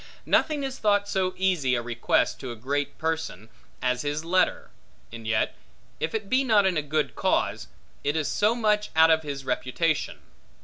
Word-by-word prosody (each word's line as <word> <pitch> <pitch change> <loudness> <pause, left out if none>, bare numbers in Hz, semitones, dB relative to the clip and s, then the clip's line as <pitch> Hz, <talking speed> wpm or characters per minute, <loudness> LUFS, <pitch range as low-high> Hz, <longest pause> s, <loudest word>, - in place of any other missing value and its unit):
Nothing 300 -3 +2
is 270 0 -4
thought 205 -1 +2
so 185 -2 -1
easy 175 -9 +1
a 120 - -1
request 120 0 0
to 130 -3 -6
a - - -6
great 140 +5 -2
person, 160 - -3 0.3
as 125 0 +1
his 150 +2 -3
letter; 185 +2 +1 0.4
and 115 -1 -8
yet, 110 0 0 0.4
if 160 - -2
it 215 -2 -3
be 260 +5 +2
not 215 -6 +4
in 190 -2 +2
a 155 - +1
good 150 +1 -1
cause, - - 0 0.4
it 145 +2 0
is 155 -3 0
so 215 +3 +2
much 210 -2 +1
out 160 +1 +6
of 160 0 +4
his 140 -3 -6
reputation. 155 +5 -1
160 Hz, 180 wpm, -26 LUFS, 135-205 Hz, 0.4 s, out